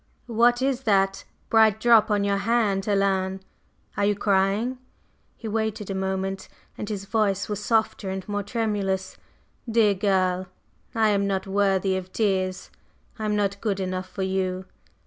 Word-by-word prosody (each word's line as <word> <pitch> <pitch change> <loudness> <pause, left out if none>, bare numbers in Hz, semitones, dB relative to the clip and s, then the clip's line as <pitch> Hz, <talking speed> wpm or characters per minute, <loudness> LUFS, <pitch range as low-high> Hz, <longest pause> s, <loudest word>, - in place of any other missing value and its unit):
What 240 +1 +3
is 270 -1 0
that 195 -4 +1 0.3
bright 220 -1 +5
drop 230 -2 +5
on 205 -1 +2
your 200 0 +1
hand, 205 -3 +1
Helen? 195 -2 0 0.5
are 200 - +1
you 205 0 +2
crying?" 200 +5 +1 0.6
He 225 - -7
waited 220 -1 -2
a - - -1
moment, 190 0 -2 0.3
and 210 - -6
his 200 -2 -4
voice 200 -2 0
was 210 -1 -4
softer 220 -3 0
and 190 -1 -5
more 205 -1 -2
tremulous. 200 -3 -2 0.5
"Dear 220 -2 +4
girl, 185 -2 +1 0.5
I 220 -1 +3
am 200 -1 +1
not 190 -1 -1
worthy 195 -1 +1
of 185 0 -7
tears. 190 -3 -1 0.5
I 215 - -3
am 210 0 0
not 200 -1 -1
good 200 -3 -1
enough 185 0 -3
for 190 0 -4
you." 190 -1 -1
200 Hz, 155 wpm, -25 LUFS, 190-220 Hz, 0.6 s, bright